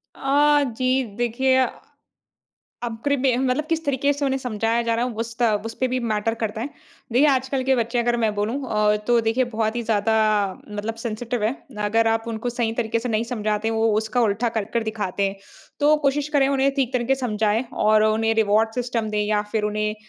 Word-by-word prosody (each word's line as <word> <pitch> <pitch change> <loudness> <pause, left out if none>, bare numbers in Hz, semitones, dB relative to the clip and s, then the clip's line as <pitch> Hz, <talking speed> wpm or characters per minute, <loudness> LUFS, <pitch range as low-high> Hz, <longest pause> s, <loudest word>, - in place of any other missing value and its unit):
अ, 290 +2 +3
जी, 255 +1 +2
देखिए। 260 +2 +2 1.3
अब 230 -2 -3
प्री 285 0 +2
मे 260 -2 +2
मतलब 260 +3 0
किस 325 -1 0
तरीके 280 0 +1
से 285 0 -3
उन्हें 270 0 0
समझाया 230 -2 -1
जा 230 0 0
रहा 235 +1 0
है 250 - -2
उस 230 0 -9
ता 235 -3 +3
उसपे 230 +3 -2
भी 255 +1 -1
मैटर 225 -1 -1
करता 215 0 -2
है। 255 - -3 0.4
देखिए 260 +6 +5
आजकल 265 0 +1
के 265 0 +3
बच्चे 235 +1 -1
अगर 240 0 +1
मैं 220 -3 0
बोलूँ 210 +3 -1 0.2
अ, 210 0 +3
तो 240 -1 +4
देखिए 225 +3 +1
बहुत 220 -1 -2
ही 240 - -1
ज़्यादा 220 -1 +1 0.6
मतलब 210 +2 -4
सेंसिटिव 235 0 -3
है। 220 - +2 0.3
अगर 225 +2 +2
आप 225 0 0
उनको 225 +1 -3
सही 235 -2 -1
तरीके 230 -1 0
से 245 +2 -4
नहीं 220 +1 0
समझाते 215 -1 -1
हो 225 - -1
वो 225 -1 +3
उसका 220 +3 0
उल्टा 225 +1 +1
कर 215 - +1
कर 235 - +2
दिखाते 210 -3 -3
हैं, 195 - -7 0.4
तो 300 +1 +5
कोशिश 285 +1 +1
करें 285 -3 +3
उन्हें 275 0 +2
ठीक 265 -3 0
तरीके 250 +1 +1
से 270 - -9
समझाएँ 220 -1 0
और 215 0 +3
उन्हें 225 +1 +2
रिवार्ड 220 0 +2
सिस्टम 240 -3 -2
दें 210 0 0
या 210 0 +1
फिर 220 -2 0
उन्हें 215 0 -1
230 Hz, 210 wpm, -23 LUFS, 220-255 Hz, 1.3 s, देखिए